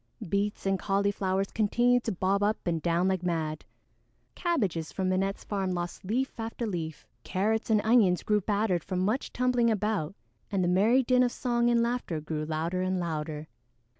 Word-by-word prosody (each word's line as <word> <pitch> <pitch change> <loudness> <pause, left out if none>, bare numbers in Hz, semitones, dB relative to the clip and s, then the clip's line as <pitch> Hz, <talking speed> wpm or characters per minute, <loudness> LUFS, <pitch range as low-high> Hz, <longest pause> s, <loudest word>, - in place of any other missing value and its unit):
Beets 200 +3 -1
and 195 -1 +1
Cauliflowers 195 -1 0
continued 240 +3 +2
to 225 - 0
bob 195 +1 0
up 210 +1 +2
and 165 -2 0
down 170 +2 +1
like 190 -2 0
mad; 160 -3 -2 0.7
Cabbages 200 - -1
from 190 -1 -1
Minette's 195 +1 -1
farm 195 -2 -2
lost 175 0 -4
leaf 235 +7 -2
after 225 +1 -3
leaf; 165 -7 -4 0.2
Carrots 215 +5 0
and 215 -2 +4
Onions 215 -6 +4
grew 210 -1 +2
battered 200 -4 0
from 185 -1 -3
much 225 +7 -1
tumbling 250 -1 +2
about, 210 -5 -1 0.3
and 195 -3 0
the - - +1
merry 215 +9 +4
din 250 0 +3
of 245 -1 +3
song 240 -1 +1
and 235 -1 +3
laughter 235 -9 -2
grew 155 0 -4
louder 165 +4 -2
and 185 0 0
louder. 155 -2 -4
195 Hz, 170 wpm, -28 LUFS, 175-225 Hz, 0.7 s, and